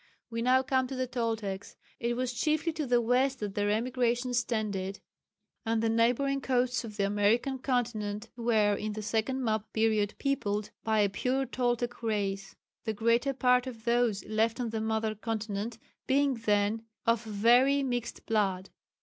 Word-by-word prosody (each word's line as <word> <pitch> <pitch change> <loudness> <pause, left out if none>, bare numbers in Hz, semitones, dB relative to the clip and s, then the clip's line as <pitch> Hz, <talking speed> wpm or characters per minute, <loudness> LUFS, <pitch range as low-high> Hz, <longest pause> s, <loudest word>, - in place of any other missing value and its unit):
We 230 0 -2
now 255 +2 +4
come 260 -1 +1
to 265 - -5
the 255 0 -1
Toltecs. 225 -6 -3 0.2
It 240 0 -1
was 255 0 -1
chiefly 310 +5 0
to 310 -3 -3
the 245 -1 +4
west 255 +3 +2
that 205 -2 -4
their 205 0 0
emigrations 245 +2 +1
tended, 200 -5 -2 0.6
and 225 -1 0
the 225 - +2
neighbouring 250 +5 +2
coasts 250 -1 +1
of 215 -2 -8
the 200 - +2
American 215 +7 +1
continent 225 -5 -1
were 225 -3 +2
in 210 +1 -3
the 215 0 -5
second 230 +5 -1
map 220 -2 -1
period 215 -2 +1
peopled 215 -7 -1
by 220 -1 +2
a 205 - +4
pure 260 +6 0
Toltec 245 -2 -1
race, 195 -3 -2 0.3
the 220 - -2
greater 230 +5 +2
part 250 -1 +3
of 230 -3 -8
those 235 -4 +1
left 220 +3 0
on 235 -3 -2
the 220 -1 -2
mother 220 0 0
continent 220 0 -4 0.3
being 275 +1 +3
then 215 -1 +1 0.2
of 230 -1 +2
very 240 +6 +4
mixed 245 -3 -3
blood. 195 -4 0
230 Hz, 165 wpm, -30 LUFS, 215-250 Hz, 0.6 s, now